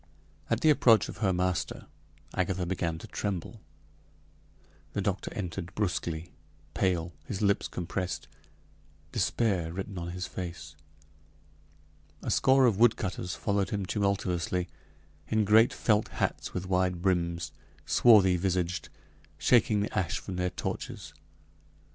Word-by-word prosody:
At 115 +1 +1
the 155 - +6
approach 115 -7 +5
of - - -8
her 100 -3 +1
master, 90 -3 -1 0.5
Agatha 95 0 0
began 85 -2 -2
to - - -10
tremble. 100 -5 -4 1.3
The 100 - -1
doctor 100 0 -2
entered 90 -3 -5
brusquely, 85 -5 -2 0.4
pale, 90 -2 0
his 100 0 -3
lips 100 0 +2
compressed, 90 0 -4 0.8
despair 95 -8 0
written 95 +1 -5
on 85 0 -5
his 90 +1 -4
face. 85 -6 -7 1.5
A - - -2
score 130 0 +5
of 110 -5 +2
woodcutters 100 -6 +2
followed 100 -2 0
him 100 -2 -2
tumultuously, 90 -3 -1 0.6
in 110 -1 +2
great 110 +3 +6
felt 105 -1 +2
hats - - -2
with 90 0 -4
wide 90 -1 0
brims 85 -4 0 0.3
swarthy 100 -6 +6
visaged 90 -2 -1 0.5
shaking 110 -4 +4
the 105 - -3
ash 90 -2 0
from 95 - -6
their 90 0 0
torches. - - -5
95 Hz, 125 wpm, -29 LUFS, 90-105 Hz, 1.5 s, the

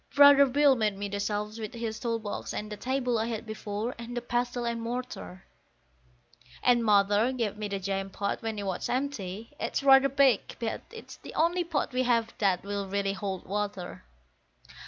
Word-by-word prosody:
Brother 285 -1 +8
Bill 280 +1 +4
made 215 -4 0
me 200 0 -3
the 200 +1 -3
shelves 210 +2 -2
with 220 +2 -6
his 225 -2 -4
tool 230 0 -1
box, 210 -2 -5
and 210 0 -4
the - - -3
table 250 0 -1
I 220 - 0
had 225 -1 -4
before, 215 +2 -4
and 240 +1 -6
the - - -1
pestle 245 0 -1
and 235 -1 -2
mortar; 230 - -5 1.2
And 240 -1 +4
Mother 205 +2 +4
gave 230 -6 -2
me 210 0 -4
the 200 -1 -2
jam 195 0 -2
pot 200 +1 -3
when 225 -1 -3
it 200 - -4
was 190 -2 -2
empty; 230 -6 -3
it's - - -2
rather 270 0 +7
big, 270 -4 +3
but 230 -1 -3
it's 455 -1 -11
the - - -11
only 345 +2 +2
pot 315 -5 -2
we 255 - +1
have 230 -2 +1
that 190 -4 +2
will 200 0 -3
really 200 0 0
hold 195 -2 -4
water. 200 - -4
225 Hz, 190 wpm, -29 LUFS, 200-250 Hz, 1.2 s, Brother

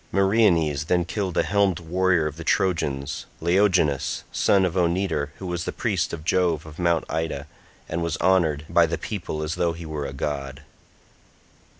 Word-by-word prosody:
Meriones 95 -8 +3
then 90 +1 +1
killed 95 -1 -3
a - - +4
helmed 100 -4 +2
warrior 90 0 +1
of 75 - -3
the 85 - -8
Trojans, 75 -7 -1
Laogonus 85 -5 +2
son 95 -2 +3
of 90 - -2
Onetor, 90 -4 0
who 95 - -8
was 90 -2 -3
priest - - 0
of 80 -2 -7
Jove 85 -4 +1
of 80 +1 -11
Mt. 85 -2 +2
Ida, 80 -3 -3 0.4
and 85 +1 -3
was 85 -1 -1
honoured 80 -6 +2
by 85 +1 +4
the 85 +1 -2
people 85 -7 -4
as 75 +1 -2
though 85 -1 0
he 85 +1 -8
were 75 -2 -4
a 70 - -7
god. 70 0 -4
85 Hz, 170 wpm, -24 LUFS, 75-95 Hz, 0.4 s, a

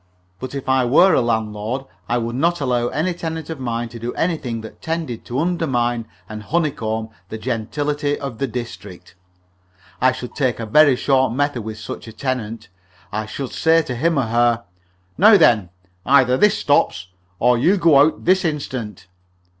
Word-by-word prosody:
But 130 +1 -6
if 135 -1 -6
I 130 -1 +3
were 155 +10 +5
a - - +4
landlord, 110 +2 -2 0.2
I 120 - +1
would 115 0 -3
not 170 +6 +1
allow 125 -4 0
any 160 +8 -1
tenant 160 -2 -5
of 160 - -6
mine 120 -2 -3
to 115 0 -10
do 120 +2 -5
anything 140 -9 -2
that 110 - -12
tended 160 -8 -4
to 120 - -4
undermine 125 -8 0 0.2
and 110 0 -7
honeycomb 110 -6 -2 0.2
the 110 - -5
gentility 145 +6 -2
of 135 -5 -6
the 135 - 0
district. 95 -7 -8 0.9
I 130 +1 +5
should 125 -1 -7
take 130 -5 -1
a 115 - -3
very 145 +4 +5
short 130 -1 +2
method 145 -2 -1
with 110 0 -7
such 110 - -8
a 110 - -9
tenant. 115 -4 -4 0.4
I 110 +1 -3
should 130 +4 -5
say 165 0 +3
to 125 - -5
him 165 +6 +1
or 135 - +2
her: 120 0 +1 0.6
"Now, 210 +3 +8
then, 110 - +4 0.3
either 130 -2 +4
this 210 +9 +3
stops, 95 -9 +1 0.3
or 125 +4 +3
you 180 +11 +3
go 165 -6 +5
out 150 +3 +2
this 185 +1 +3
instant." 130 - -4
125 Hz, 175 wpm, -20 LUFS, 115-150 Hz, 0.9 s, Now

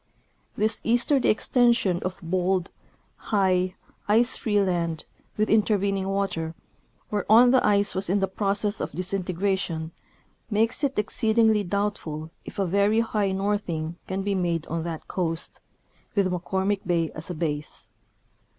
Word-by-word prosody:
This 215 +1 0
easterly 245 +3 +3
extension 235 -6 +3
of 185 +1 -4
bold, 180 +1 0 0.5
high, 185 -3 +1 0.3
ice 230 +4 +4
free 210 -2 0
land, 170 -4 0 0.3
with 215 0 +2
intervening 200 -3 +2
water, 180 -5 -2 0.6
whereon 220 +4 +5
the 260 -1 +4
ice 205 -1 +3
was 190 -1 0
in 195 - +3
the 195 -1 +1
process 205 +2 -1
of - - -4
disintegration, 185 -3 -2 0.6
makes 225 +6 +1
it 275 -1 0
exceedingly 220 0 +2
doubtful 175 -5 -3
if - - -9
a 195 - +1
very 200 +5 +3
high 210 -3 0
northing 190 -5 -2
can 190 +1 -2
be 200 0 0
made 170 -4 -1
on 165 0 -3
that 165 -2 -5
coast, 165 -2 -2 0.5
with 195 -3 +2
McCormick 190 +3 -1
bay 170 -3 +1
as 155 +3 -3
a 180 - -4
base. 150 -2 -3
195 Hz, 135 wpm, -25 LUFS, 175-210 Hz, 0.6 s, whereon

